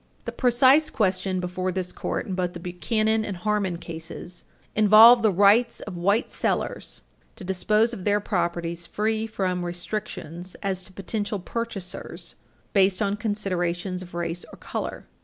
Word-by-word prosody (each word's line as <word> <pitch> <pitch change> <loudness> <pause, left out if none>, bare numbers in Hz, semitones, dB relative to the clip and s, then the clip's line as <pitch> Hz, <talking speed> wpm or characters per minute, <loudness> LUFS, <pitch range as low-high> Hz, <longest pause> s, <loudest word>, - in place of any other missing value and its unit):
The - - -3
precise 260 +5 +4
question 190 -4 0
before 185 +1 -2
this 185 0 -3
Court - - -3
in 195 - -4
both 180 -1 -1
the 175 - -7
Buchanan 215 +5 0
and 200 -4 -4
Harmon 200 -2 0
cases 170 +1 -8 0.3
involved 220 +3 +8
the 220 - +4
rights 205 +6 +4
of 200 - -7
white 200 +7 +1
sellers - - -2 0.3
to 210 - -9
dispose 210 +5 +2
of 195 -6 -6
their 205 +1 +2
properties 170 -4 -2
free 220 +1 -1
from 185 -4 -2
restrictions 175 -1 -5
as 190 -2 -1
to - - -16
potential 205 +2 -3
purchasers 195 -2 -5 0.4
based 195 -1 +4
on 205 -2 +1
considerations 185 -4 -2
of 175 -2 -10
race 170 0 -3
or - - -12
color. - - -5
195 Hz, 150 wpm, -25 LUFS, 180-215 Hz, 0.4 s, involved